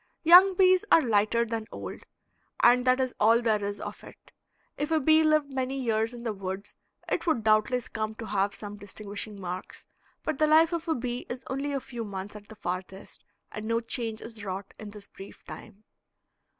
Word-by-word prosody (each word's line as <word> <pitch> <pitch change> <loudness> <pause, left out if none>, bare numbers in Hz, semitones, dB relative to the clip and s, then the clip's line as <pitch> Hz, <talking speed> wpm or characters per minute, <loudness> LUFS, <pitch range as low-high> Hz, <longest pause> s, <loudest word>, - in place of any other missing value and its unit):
Young 365 +3 +8
bees 370 0 +5
are 325 - +7
lighter 225 +1 +2
than 225 -1 -4
old, - - -7 0.6
and 245 +1 +5
that 255 +1 +4
is 255 -1 -1
all 225 +2 +5
there 220 -3 +1
is 200 0 -4
of - - -7
it. - - -15 0.4
If 295 - -3
a 320 -1 +2
bee 315 +2 +5
lived 310 -2 +2
many 265 0 -2
years 225 -2 0
in 240 -1 -9
the 225 -3 -2
woods 190 0 -6 0.3
it - - -2
would 265 -9 +1
doubtless 220 +4 +2
come 220 -2 -4
to 225 - -7
have 200 -1 0
some 205 -1 -7
distinguishing 205 +1 -7
marks, 180 0 -6 0.4
but 310 -3 -3
the 310 - +4
life 320 +2 +5
of 335 0 -3
a 320 - +1
bee 245 0 -4
is 250 +1 -6
only 275 +2 -2
a 275 - -1
few 240 -3 -7
months 200 -1 -7
at 205 -1 -11
the 220 - -12
farthest, 185 -1 -6 0.3
and 215 0 -6
no 230 0 +1
change 230 -1 -3
is 225 -2 -8
wrought 195 0 -6
in 215 - -8
this 205 -1 -11
brief 195 0 -13
time. 215 -1 -11
230 Hz, 200 wpm, -28 LUFS, 205-265 Hz, 0.6 s, Young